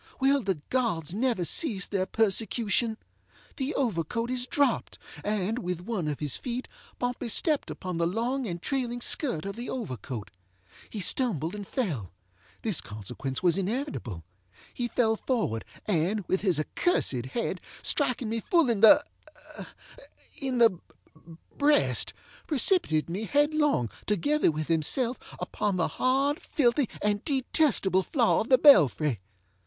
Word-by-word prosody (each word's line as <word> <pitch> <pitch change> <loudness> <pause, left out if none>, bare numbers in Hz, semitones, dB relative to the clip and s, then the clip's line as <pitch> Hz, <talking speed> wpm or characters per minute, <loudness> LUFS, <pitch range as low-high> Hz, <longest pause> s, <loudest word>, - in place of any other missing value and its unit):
Will 275 +1 +3
the 190 -7 -2
gods 200 - -1
never 225 -4 0
cease 210 - +3
their 190 -2 -2
persecution? 220 +1 +1 0.6
The 275 +3 -2
overcoat 230 - -1
is 250 0 -1
dropped, 285 +1 0 0.3
and, 210 +2 -1
with 180 -6 -3
one 185 -4 -3
of 150 -2 -3
his 150 -4 -1
feet, 250 0 -4 0.3
Pompey 245 -1 -3
stepped 300 +6 +1
upon 185 -3 -5
the 170 - +2
long 240 +7 -2
and 175 -2 -4
trailing 245 +2 -2
skirt 240 - +2
of 200 - -5
the 240 +2 -6
overcoat. 130 - -6 0.6
He 210 - -5
stumbled 180 - +1
and 205 -2 -7
fellŌĆöthis 105 - -4
consequence 125 - -5
was 180 +1 +3
inevitable. 195 - -4 0.5
He 245 - -2
fell 225 -1 +1
forward, 215 - -1 0.2
and, 195 +1 0
with 190 - 0
his 185 -6 +2
accursed 140 - 0
head, 230 - -3 0.2
striking 255 -5 +1
me 225 +1 -2
full 320 +1 +2
in 210 -4 -1
theŌĆöin 295 0 -1
the 225 -7 +4 0.8
breast, 290 0 +3 0.4
precipitated 290 - +2
me 190 +6 -4
headlong, 295 - +2 0.2
together 285 - +2
with 155 -1 -3
himself, 230 - 0 0.2
upon 200 -3 -2
the 170 - +1
hard, 275 +3 0
filthy, 250 -2 +1
and 205 -1 0
detestable 260 - +1
floor 235 - +2
of 220 - -5
the 260 - +7
belfry. 150 - +5
220 Hz, 135 wpm, -27 LUFS, 170-260 Hz, 0.8 s, the